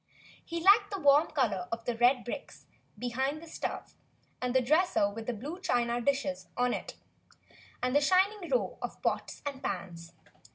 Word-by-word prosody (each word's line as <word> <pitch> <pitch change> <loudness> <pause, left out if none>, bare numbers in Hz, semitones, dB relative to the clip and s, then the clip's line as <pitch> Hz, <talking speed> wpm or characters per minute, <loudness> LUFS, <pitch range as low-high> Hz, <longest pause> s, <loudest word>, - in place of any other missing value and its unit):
He 335 0 -4
liked 405 +4 +6
the 400 - -4
w^rm 290 -1 +4
color 210 -11 0
of 230 0 -4
the 240 - -1
red 245 +2 +3
bricks 275 +4 -7 0.3
behind 265 +5 -2
the 335 - -11
stove, 325 - -5 0.5
and 250 0 -1
the - - +7
dresser 305 - +3
with 220 +2 -8
the - - +1
blue 295 - -7
china 240 -8 +1
dishes 280 +1 -1
on 245 0 +2
it, - - -5 0.9
and 250 +2 +1
the 290 - +5
shining 375 +4 +2
row - - 0
of - - -5
pots - - -2
and 280 -2 -4
pans. 175 -3 -5
265 Hz, 170 wpm, -30 LUFS, 240-325 Hz, 0.9 s, the